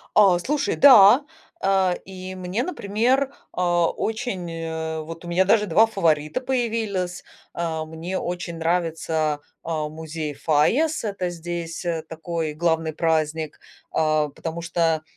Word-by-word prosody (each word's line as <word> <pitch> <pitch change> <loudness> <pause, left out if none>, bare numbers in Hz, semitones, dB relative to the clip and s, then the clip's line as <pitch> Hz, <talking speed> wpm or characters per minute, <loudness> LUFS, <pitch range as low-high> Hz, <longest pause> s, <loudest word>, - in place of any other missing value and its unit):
А, 195 -4 +6
слушай, 290 +9 -1
да. 250 -1 +8 0.4
А, 190 -2 +3
и 185 0 -8
мне, 185 +5 -2
например, 260 - 0 0.2
а, 175 -2 +2
очень, 215 -5 -3
э 160 -1 -4
вот 165 +2 -9
у - - -7
меня 175 +2 +3
даже 210 +2 +4
2 200 +6 +5
фаворита 160 -7 +1
появились. 225 -8 -2 0.3
А, 165 -2 -2
мне 165 +4 -5
очень 175 -1 -4
нравится, 160 -2 0 0.2
а, 155 -2 -2
музей 155 -1 -5
Файас. 225 - +2
Это 200 -4 -2
здесь, 170 0 -5
э, 165 -2 -1
такой 165 -1 -4
главный 160 0 0
праздник, 160 -1 -1 0.3
а, 155 -1 +1
потому 165 +4 -6
что, 165 -1 0
170 Hz, 130 wpm, -23 LUFS, 160-195 Hz, 0.4 s, да